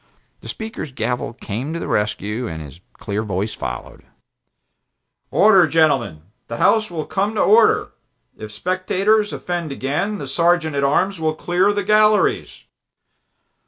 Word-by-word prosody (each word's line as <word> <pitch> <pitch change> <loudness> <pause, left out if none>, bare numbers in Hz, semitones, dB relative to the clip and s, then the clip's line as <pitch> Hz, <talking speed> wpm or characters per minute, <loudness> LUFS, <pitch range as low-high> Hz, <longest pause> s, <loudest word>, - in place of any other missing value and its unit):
The - - -12
Speaker's 220 - -6
gavel 125 -2 -3
came 125 +5 -5
to 170 - -3
the - - -5
rescue 105 +3 -2
and 80 -1 -6
his 75 +2 -11
clear 105 +1 -4
voice 105 0 -3
followed: - - -7 1.3
"Order, 195 -4 +5
gentlemen! 135 - +1 0.2
The 115 - -5
House 215 - +3
will 160 -3 -4
come 200 +3 -2
to 210 - +1
order! 220 +2 +4 0.4
If 110 -1 -9
spectators 185 - 0
offend 175 -4 -4
again, 145 +10 -2
the 140 - -6
Sergeant 170 +1 +1
at 140 - 0
arms 185 +7 +1
will 155 -1 -1
clear 180 +5 +1
the 205 0 -2
galleries!" 215 +1 +2
160 Hz, 140 wpm, -20 LUFS, -, 1.3 s, Order